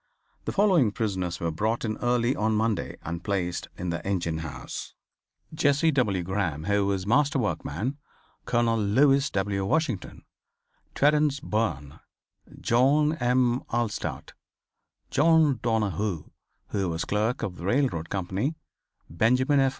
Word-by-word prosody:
The - - -1
following 185 - +3
prisoners 95 -5 -2
were 85 -1 -1
brought 110 +9 -1
in 110 -1 -2
early 120 +1 +1
on 110 0 +1
Monday 110 0 -1
and 85 0 -5
placed 90 -4 -2
in 90 -1 -3
the 85 0 -4
engine 85 -5 -1
house: 80 -3 -7 0.6
Jesse 150 +1 +3
W. 105 - +1
Graham 85 -5 -2
who 100 +1 +1
was 95 -2 -1
master 140 +6 +2
workman, 120 - -2 0.5
Colonel 115 -1 +1
Lewis 135 +7 +3
W. 100 0 -1
Washington, 120 - -2 0.7
Terance 150 -1 +3
Byrne, 105 - -2 0.6
John 145 +6 +3
M. 125 -1 +2
Allstadt, 120 -3 -3 0.8
John 155 -3 +4
Donohue, 105 -6 -1 0.4
who 95 -3 -1
was 80 +1 -2
clerk 110 +4 -1
of 90 -2 -4
the 85 - -7
railroad 100 - 0
company; 100 - -2 0.5
Benjamin 125 - +2
F. 135 0 +4
110 Hz, 125 wpm, -26 LUFS, 95-135 Hz, 0.8 s, John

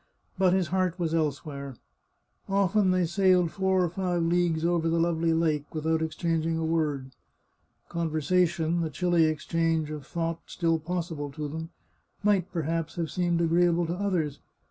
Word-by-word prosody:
But 185 -2 +3
his 185 -4 +1
heart 185 -1 0
was 165 -3 -1
elsewhere. 140 -3 -2 0.7
Often 195 0 +2
they 185 -1 +2
sailed 180 -1 +3
four 190 -2 +1
or 175 - 0
five 180 -2 -1
leagues 170 -1 +1
over 170 -1 +1
the 165 0 +1
lovely 165 0 +1
lake 155 -3 0
without 160 +1 0
exchanging 165 0 -1
a 165 - -1
word. 150 -5 -1 0.8
Conversation, 170 +1 +1
the 160 - -1
chilly 175 +1 +2
ex 155 -1 -3
change 165 -2 0
of 150 -2 -7
thought 165 -1 -2
still 165 -1 0
possible 165 -3 -3
to 150 -1 -4
them, 160 +2 -6 0.5
might, 195 -3 +2
perhaps, 165 -1 -2
have 165 -2 -3
seemed 175 -2 +1
agreeable 170 +1 +3
to 165 - -2
others. 175 -7 -1
165 Hz, 155 wpm, -27 LUFS, 160-180 Hz, 0.8 s, But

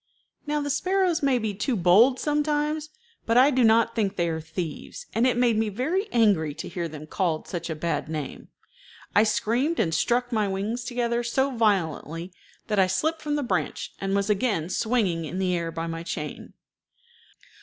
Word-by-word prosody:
Now 300 0 0
the 285 0 -2
sparrows 365 +2 +1
may 275 -3 +3
be 220 -3 -2
too 210 +6 -1
bold 215 +8 +5
sometimes, 300 +1 0 0.4
but 230 +1 +3
I 265 +3 +6
do 255 -2 +2
not 230 +1 +4
think 205 -3 0
they 170 -2 0
are 160 0 -3
thieves, 165 - -6
and 235 +3 +3
it 250 - +1
made 240 -3 +3
me 220 -1 +1
very 315 - -1
angry 195 -11 +2
to 160 - -6
hear 170 -1 -3
them 155 -1 -9
called 165 -1 -1
such 170 -1 -5
a 160 - -2
bad 165 0 -2
name. 155 -3 -5 0.7
I 205 - +6
screamed 235 +8 +1
and 160 - +1
struck 245 +8 +1
my 215 -3 +1
wings 205 +5 -2
together 240 -1 -1
so 265 +3 0
violently 175 -5 0 0.3
that 210 -2 0
I 190 - +5
slipped 315 - -1
from 295 -1 -1
the 295 - -1
branch, 245 - -2
and 195 0 0
was 200 0 +1
again 205 -6 0
swinging 195 -8 0
in 165 +4 -5
the 185 -1 +1
air 170 -1 -2
by 165 0 -4
my 165 0 -4
chain. 155 -3 -6
215 Hz, 185 wpm, -25 LUFS, 170-255 Hz, 0.7 s, I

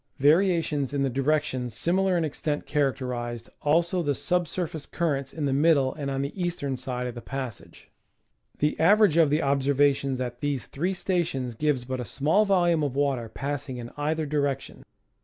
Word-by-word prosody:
Varia 165 +5 +4
tions 145 -3 -2
in 140 - +1
the 135 - 0
direction 135 -2 0
similar 180 - +1
in 165 - +1
extent 150 0 -3
characterized 125 -5 -2
also 170 +4 +2
the 145 -4 0
sub 180 +3 0
surface 160 -3 -4
currents 140 -5 -1
in 155 -3 -3
the 135 - +1
middle 140 -2 +3
and 145 -2 -4
on 135 0 -1
the 150 +7 -5
eastern 170 -6 -2
side 125 -1 -4
of 125 - -4
the 120 - -8
passage. 130 -4 -7 0.7
The 150 +1 0
average 200 0 +5
of 165 -3 +5
the 150 +3 +1
observations 140 -1 +2
at 120 -1 -4
these 145 -2 -2
three 180 +7 -2
stations 170 -10 -1
gives 135 0 0
but 130 0 -3
a 125 - -4
small 160 - +2
volume 175 -5 +3
of 140 -3 -1
water 135 -5 0
passing 140 0 -4
in 120 -1 -7
either 155 +2 -1
direction. 140 -2 -2
145 Hz, 175 wpm, -26 LUFS, 130-160 Hz, 0.7 s, average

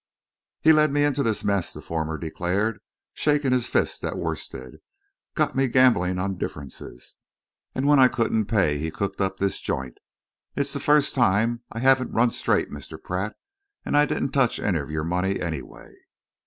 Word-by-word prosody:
"He 160 - +6
led 155 -1 +4
me 145 +1 +2
into 145 -1 +1
this 115 -5 0
mess," 100 -3 0
the - - -9
former 80 -1 -3
declared, 95 +7 -2 0.3
shaking 145 -3 +1
his 125 -1 +1
fist - - 0
at - - -3
Worstead. - - -5 0.6
"Got 155 -2 +1
me 135 0 +2
gambling 115 -8 +3
on 95 0 -2
differences, 70 -5 -8 0.6
and 130 - -1
when 145 -1 +5
I 130 - +8
couldn't 115 -3 0
pay 90 -10 +1
he 80 +2 -2
cooked 100 +4 -3
up 95 0 -1
this 100 0 -1
joint. 65 -2 -4 0.6
It's 140 0 0
the 140 - -3
first 150 0 +3
time 115 0 +2
I - - -8
haven't 130 +1 +3
run 120 +1 +3
straight, - - 0
Mr. 75 -2 -8
Pratt, 95 +4 -4 0.5
and - - -1
I 150 0 +5
didn't 135 - -1
touch 135 -4 +2
any 90 -6 0
of 70 - -6
your 75 0 -2
money, 90 +4 -1
anyway." 80 -8 -6
110 Hz, 175 wpm, -24 LUFS, 90-135 Hz, 0.6 s, I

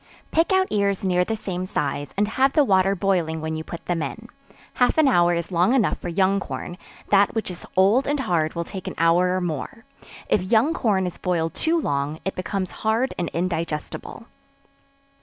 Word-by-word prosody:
Pick 330 +3 +2
out 380 0 +4
ears 200 -2 0
near 180 -1 +2
the 225 +4 -2
same 185 -3 -4
size, 145 -3 -2
and 205 +1 +2
have 265 +4 +2
the 300 - +5
water 195 -4 +3
boiling 175 -4 0
when 160 0 -3
you 160 - -4
put 170 - -9
them 175 -2 -1
in; - - -6 0.4
half 250 +4 +2
an 310 -2 +5
hour 175 -8 +4
is 170 +2 -4
long 180 +8 +3
enough 240 -6 +1
for 175 - -5
young 190 +3 +2
corn; 180 -2 -6 0.3
that 200 +1 +4
which 220 -4 -2
is 175 - -10
old 205 +8 +4
and 290 0 0
hard 170 -9 0
will 170 - -1
take 185 +2 -8
an - - -5
hour 165 +2 +4
or - - -2
more; 175 - -5 0.4
if 205 - +2
young 225 - +2
corn 200 - +1
is 180 - -5
boiled 165 -3 -1
too 330 +1 +1
long, 145 - -1
it 195 - -1
becomes 185 0 -3
hard 225 +4 +1
and 175 - -1
indigestible. 165 -3 -4
185 Hz, 195 wpm, -23 LUFS, 170-220 Hz, 0.4 s, the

